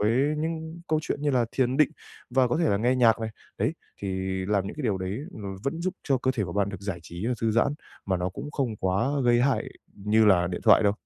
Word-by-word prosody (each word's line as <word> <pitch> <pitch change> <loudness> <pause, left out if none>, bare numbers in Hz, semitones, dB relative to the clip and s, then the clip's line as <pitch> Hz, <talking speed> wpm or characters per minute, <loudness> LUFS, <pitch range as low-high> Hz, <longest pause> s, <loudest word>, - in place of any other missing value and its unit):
với 105 +2 +3 0.3
những 160 +1 -4
câu 155 - +2
chuyện 140 - -3
như 145 - +2
là 125 -3 +3
thiền 130 0 +1
định 150 -1 +4 0.4
và 130 0 +3
có 120 - +1
thể 165 -3 +2
là 100 - +3
nghe 120 +5 +2
nhạc 115 -3 +4
này, 110 0 -3 0.3
đấy, - - +1 0.3
thì 100 - -2 0.4
làm 100 -1 +1
những - - -6
cái 150 - -4
điều 105 -7 0
đấy 95 +4 -3
nó 100 -3 -6
vẫn 160 +5 -2
giúp 185 +1 -1
cho 135 -3 +2
cơ 130 - +1
thể 110 -5 0
của 85 - -6
bạn 100 +1 +1
được 95 -2 -7
giải 100 -4 -4
trí 85 +5 -6
và 125 - +1
thư 115 - +2
giãn, 120 +6 +2 0.3
mà 95 - +1
nó 90 +1 -1
cũng 100 +10 -7
không 130 -7 -2
quá 95 +5 +1 0.2
gây 120 0 +4
hại 135 +1 +2 0.3
như 105 +2 +3
là 90 -4 +5
điện 90 - -3
thoại - - +7
đâu. 100 -1 +4
115 Hz, 260 wpm, -27 LUFS, 100-135 Hz, 0.4 s, thoại